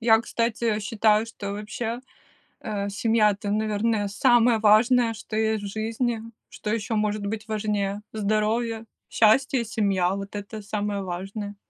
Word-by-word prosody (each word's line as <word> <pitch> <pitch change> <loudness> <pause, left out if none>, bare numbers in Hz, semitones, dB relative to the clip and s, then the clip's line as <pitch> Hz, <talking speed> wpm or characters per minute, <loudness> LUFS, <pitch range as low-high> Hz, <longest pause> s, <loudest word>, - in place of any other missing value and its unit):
Я, 225 -1 +5
кстати, 230 -1 -1
считаю, 215 +1 +2
что 200 -3 -6
вообще, 220 +3 -4 0.6
э, 200 -2 -3
семья- 215 +1 +3
это, 205 0 -4
наверное, 215 0 0
самое 240 +1 +4
важное, 225 +2 +4
что 220 0 -7
есть 220 -1 0
в - - -3
жизни, 225 +2 -2 0.3
что 210 - -6
еще 225 0 -2
может 210 -1 0
быть 220 +1 -4
важнее. 210 -2 -1
Здоровье, 220 +2 0 0.2
счастье 245 +3 +3
и - - -5
семья- 200 -5 +1
вот 200 +1 -6
это 205 +2 -6
самое 205 -1 -2
важное. 195 +3 -5
215 Hz, 145 wpm, -25 LUFS, 205-225 Hz, 0.6 s, Я